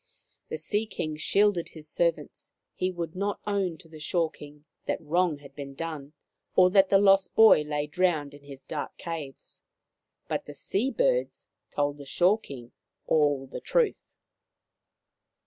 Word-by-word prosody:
The - - -3
Sea 215 +1 -1
King 155 -7 -4
shielded 195 +2 +2
his 155 -2 -6
servants; 170 +2 -1 0.2
he 185 - -1
would 170 -2 -5
not 200 +2 -2
own 195 -5 -1
to 175 - -17
the 160 -1 -12
Shore 165 +1 0
King 150 0 -13 0.2
that - - -1
wrong 170 0 +1
had 140 -1 -15
been 140 -2 -8
done, 155 -2 -6 0.4
or 185 0 +6
that 195 -1 +5
the 195 - +6
lost 195 -1 +4
boy 220 -8 +8
lay 150 0 -2
drowned 155 -3 0
in 145 - -13
his 140 -1 -11
dark 150 - -5
caves; 155 -6 -7 0.6
but - - -3
the 145 - -9
sea 205 - -1
birds - - 0 0.2
told 145 0 -1
the 140 - -9
Shore 180 +9 +3
King 125 - -10 0.3
all 145 -3 +2
the 130 - -8
truth. 480 -5 0
165 Hz, 160 wpm, -27 LUFS, 145-195 Hz, 0.6 s, boy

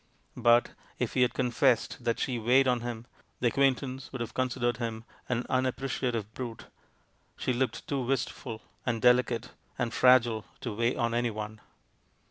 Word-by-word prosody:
But, 120 0 +4 0.3
if - - -2
he 125 - +2
had 125 - +3
confessed 125 -1 +1
that 115 - +1
she 125 -3 -1
weighed 130 +4 +4
on 125 -1 +2
him, 120 -1 -5 0.3
the 120 - +3
acquaintance 135 0 0
would 135 - -6
have 115 -1 -4
considered 120 -1 0
him 115 -2 -4 0.3
an 125 -1 0
unappreciative 130 -4 -1
brute; 120 -3 -6 0.7
she 130 - 0
looked 125 +1 -2
too 140 -2 -1
wist 130 +1 0
ful, 110 -1 -8 0.2
and 115 -2 -1
delicate, 125 -1 +3 0.3
and 120 -2 -1
fragile 120 -4 +5 0.2
to 120 -5 -3
weigh 115 +4 +1
on 115 -2 0
anyone. 110 -2 -2
120 Hz, 155 wpm, -29 LUFS, 115-130 Hz, 0.7 s, fragile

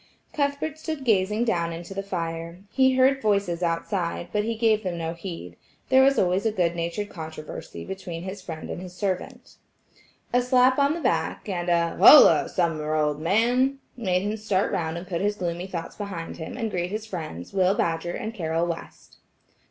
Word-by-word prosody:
Cuthbert 285 +1 -1
stood 315 -3 -4
gazing 210 0 +2
down 170 -7 0
into 170 +3 -7
the 195 - -3
fire. 170 -2 -5
He 260 -1 +3
heard 265 +1 +4
voices 200 -5 +1
outside, 170 0 -2
but 210 0 +1
he 230 +1 -2
gave 220 -1 +2
them 180 -4 -3
no 165 0 -3
heed; 165 - -8 0.3
there 260 0 +6
was 275 +1 +4
always 185 +1 +2
a 225 - +1
good 175 -5 0
natured 170 +5 -3
controversy 155 - -8
between 180 -3 -6
his 190 +1 -6
friend 160 -3 -7
and - - -5
his 180 -1 -9
servant. 190 -2 -4 0.8
A 245 - +4
slap 255 +1 +4
on 280 +2 +3
the 340 - -5
back, 255 - -1
and 175 -3 -2
"Holloa, 170 - +7
Sumner, 155 -4 0
old 150 -1 +1
man!" 245 +9 +2 0.2
made 185 -6 0
him 210 +2 -2
start 205 -3 0
round 160 0 -2
and 170 - -6
put 175 -2 -3
his 205 +1 +1
gloomy 175 -1 -3
thoughts 170 -3 -6
behind 195 -5 -6
him, 160 +7 -7
and 225 -3 -2
greet 175 -1 -2
his 215 +2 -4
friends, 160 - -7
Will 190 0 +3
Badger 165 0 -1
and 220 - -4
Carroll 165 -4 -1
West. 170 -1 -7
185 Hz, 185 wpm, -25 LUFS, 170-220 Hz, 0.8 s, Holloa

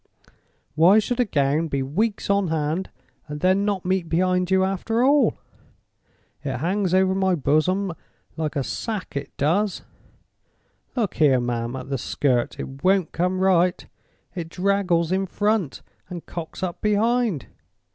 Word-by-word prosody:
Why 170 +7 +6
should 240 +3 0
a 245 - +4
gown 150 -2 +1
be 140 -3 -1
weeks 200 +11 -1
on 200 -1 +2
hand, 160 +3 -1 0.4
and 150 0 -6
then 190 +4 +2
not 200 -3 -1
meet 185 -2 0
behind 180 +1 +1
you 190 0 +3
after 195 +5 0
all? 285 +2 +3 1.1
It 135 -4 -3
hangs 185 - 0
over 190 0 +3
my 190 -1 +2
Boasom 175 +6 +1 0.4
like 160 -1 -3
a 140 - 0
sack—it 180 - -4
does. 180 +8 0 1.1
Look 225 -6 -1
here, 140 -5 +4
ma'am, 120 0 -2
at 130 0 -7
the 135 - -1
skirt. 125 -1 0
It 135 +1 -7
won't 190 -2 +2
come 180 +2 -1
right. 185 -1 +2 0.5
It 170 -4 -5
draggles 180 -3 +1
in 190 +1 0
front, 205 -5 -1 0.3
and 175 -2 -7
cocks 170 +2 -7
up 175 -2 -4
behind. 215 - +1
180 Hz, 145 wpm, -23 LUFS, 155-200 Hz, 1.1 s, Why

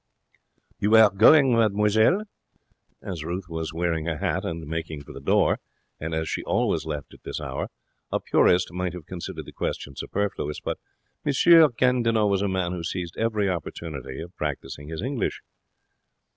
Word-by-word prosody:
'You 105 +2 +4
are 110 -2 +8
going, 130 +6 +6
mademoiselle?' 110 - +3 0.8
As 90 -5 -5
Ruth 90 +3 -4
was 80 -2 -4
wearing 85 -1 -1
her 80 -2 -2
hat - - -1
and 80 -1 -4
making 80 -1 -4
for - - -11
the - - -8
door, - - +3 0.4
and 80 +1 -3
as 80 0 -1
she - - -2
always 80 -1 0
left 75 -2 -5
at - - -16
this - - -5
hour, - - -4 0.4
a - - +1
purist 90 0 +3
might 90 -1 -2
have 90 -4 -8
considered 90 -1 -6
the - - -10
question 70 - -4
superfluous; 95 -7 -3
but - - -4 0.4
M. 145 - +1 0.4
Gandinot 115 -4 +3
was 100 -1 +1
a 100 - +1
man 95 -2 -1
who 90 -1 -4
seized 85 0 -4
every 110 -3 0
opportunity 75 -6 -5
of 85 +2 -10
practising 75 -1 -4
his 80 +4 -5
English. 130 -3 -2
90 Hz, 165 wpm, -25 LUFS, 80-105 Hz, 0.8 s, are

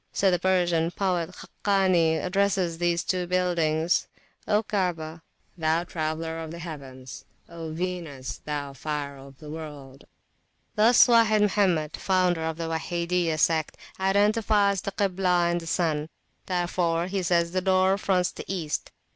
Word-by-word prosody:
So 195 -1 +3
the 180 - +1
Persian 175 -3 +2
poet 180 -2 -1
Khakani 185 -4 +1
addresses 185 -3 0
these 175 0 +1
two 180 -1 -1
buildings: 170 -2 +1 0.4
O 210 +1 +2
Kaabah, 170 -6 -2 0.3
thou 160 0 +1
traveller 160 -1 -3
of 160 -1 -6
the 170 - -7
heavens! 135 -6 -9 0.2
O 165 -1 -7
Venus, 165 -6 -5
thou 145 -2 -4
fire 145 0 -4
of 135 0 -13
the 150 0 -10
world! 145 -4 -9 0.7
Thus 230 +3 +6
Wahid 225 -3 +4
Mohammed, 185 -7 +1
founder 180 -3 +1
of 160 0 -2
the 165 -1 -3
Wahidiyah 170 0 -1
sect, 160 0 +1 0.2
identifies 200 0 +2
the 200 - -4
Kiblah 180 -3 +1
and 175 0 -1
the 165 - -9
sun; 160 -3 0 0.4
wherefore 175 -2 0
he 190 +1 -2
says 170 -1 +1
the 185 +1 0
door 190 0 +3
fronts 180 -3 +1
the - - -9
East. 170 -6 -3
175 Hz, 140 wpm, -26 LUFS, 160-185 Hz, 0.7 s, Thus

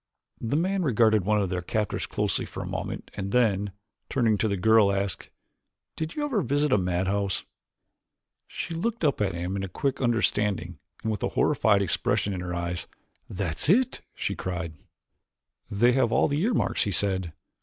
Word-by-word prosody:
The 115 +5 -1
man 190 +3 +1
regarded 110 - +3
one 105 +1 +3
of 95 -2 -1
their 90 -1 -1
captors 105 +3 -2
closely - - -1
for - - -6
a - - -6
moment - - -5
and 100 0 -4
then, 105 -5 +2 0.4
turning 115 -5 +2
to 110 - +2
the 100 -2 -1
girl 110 +1 +5
asked, 100 -3 -2 0.7
"Did 160 0 -4
you 295 - -1
ever 250 -8 0
visit 145 -1 +1
a - - +5
madhouse?" 95 +2 -1 1.0
She 170 - -5
looked 205 +3 -1
up 140 -7 +1
at 95 -3 +1
him 90 +3 -3
in 95 0 -2
quick 135 +9 -2
understanding 105 - 0 0.2
and 110 - 0
with 105 - -3
a - - 0
horrified 100 -2 +3
expression 100 +2 +1
in 90 - -4
her 90 -1 -4
eyes. 85 0 -3 0.4
"That's 90 - -2
it!" 245 +7 +3
she - - -2
cried. 85 -3 -4 1.0
"They 115 +3 +4
have 125 -2 +2
all - - +4
the 145 +2 0
earmarks," 220 +2 +1
he 100 - -1
said. 95 -4 +1
105 Hz, 175 wpm, -27 LUFS, 95-130 Hz, 1.0 s, girl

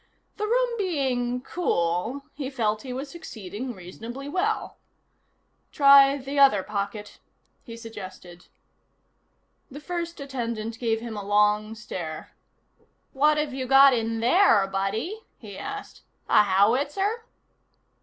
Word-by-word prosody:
The 425 0 -2
room 485 +1 +1
being 255 -9 -1
cool, 220 - -1
he 275 -2 -5
felt 220 -5 -1
he 260 - -7
was 265 +3 -5
succeeding 240 - -7
reasonably 230 +9 -9
well. 385 +8 -2 0.9
"Try 275 -1 +7
the 275 +1 -4
other 240 -9 +5
pocket," 205 +1 -5 0.4
he 230 -2 -10
suggested. 185 -6 -10 1.2
The 285 - -9
first 340 +1 -5
attendant 235 -5 -4
gave 225 -2 0
him 230 -2 -6
a 205 - -5
long 210 +2 +2
stare. 170 -8 -7 0.8
"What've 300 +1 +2
you 260 -1 -4
got 270 +1 +7
in 225 -1 -1
there, 240 - +4
buddy?" 200 - -3 0.2
he 205 -4 -11
asked. 410 - -7 0.3
"A - - +6
howitzer?" 280 - +1
245 Hz, 115 wpm, -25 LUFS, 210-285 Hz, 1.2 s, Try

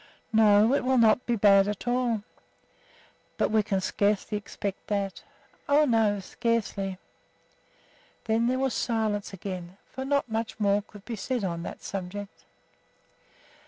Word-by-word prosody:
"No, 215 +1 +5
it 280 - +1
will 260 0 +2
not 230 +1 +4
be 240 - +2
at 200 +1 +4
all 245 0 +1
bad." 220 -3 -1 1.1
"But - - +1
we 220 0 +4
can 195 -2 -1
scarcely 205 +2 0
expect 200 -1 -5
that." 200 -2 -2 0.5
"Oh, 295 +2 +5
no! 220 -5 +2
scarcely." 195 -2 -2 1.3
Then 230 +1 +2
there 255 +1 +1
was 265 -2 0
silence 220 -3 -1
again, 185 -1 -7
for 265 - -5
not 280 0 +1
much 225 0 -3
more 205 -1 +3
could 205 -1 -15
be 235 - -4
said 245 +2 -2
on 170 -3 -2
that - - -8
subject. 195 +1 -6
210 Hz, 140 wpm, -27 LUFS, 200-235 Hz, 1.3 s, No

